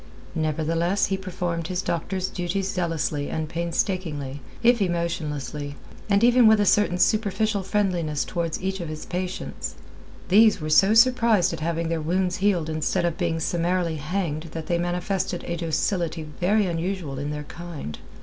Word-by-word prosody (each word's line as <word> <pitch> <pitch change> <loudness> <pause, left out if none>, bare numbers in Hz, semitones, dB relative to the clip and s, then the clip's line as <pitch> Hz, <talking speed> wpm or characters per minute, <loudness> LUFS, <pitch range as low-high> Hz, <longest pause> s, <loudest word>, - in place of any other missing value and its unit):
Nevertheless 165 +4 +1
he 195 - 0
performed 180 -3 -3
his 185 0 -2
doctor's 185 +3 -2
duties 185 +2 -2
zealously 165 -5 -1
and 160 -1 -2
painstakingly, 165 -4 -2 0.2
if 235 0 +5
emotionlessly, 150 -5 -2 0.3
and 200 +2 +3
even 245 -1 +6
with 220 -1 +6
a 205 - +3
certain 200 -2 +3
superficial 210 +1 +2
friendliness 180 -6 0
towards 170 -2 -2
each 190 0 -1
of 170 -3 -4
his 155 0 -6
patients. 180 +1 -4 0.5
These 215 +2 +6
were 155 -1 -3
so 195 +7 +6
surprised 230 -6 +4
at - - -5
having 165 +1 -1
their 165 -1 -1
wounds 180 +3 0
healed 190 -5 +1
instead 155 +2 0
of 170 +1 -2
being 170 -2 0
summarily 170 0 0
hanged 155 0 -2
that 160 -1 -5
they 170 -1 0
manifested 175 +1 -1
a 170 - -3
docility 165 0 -1
very 180 +7 +1
unusual 170 -5 -3
in 145 +1 -3
their 150 0 -4
kind. 160 - -7
175 Hz, 155 wpm, -25 LUFS, 160-190 Hz, 0.5 s, even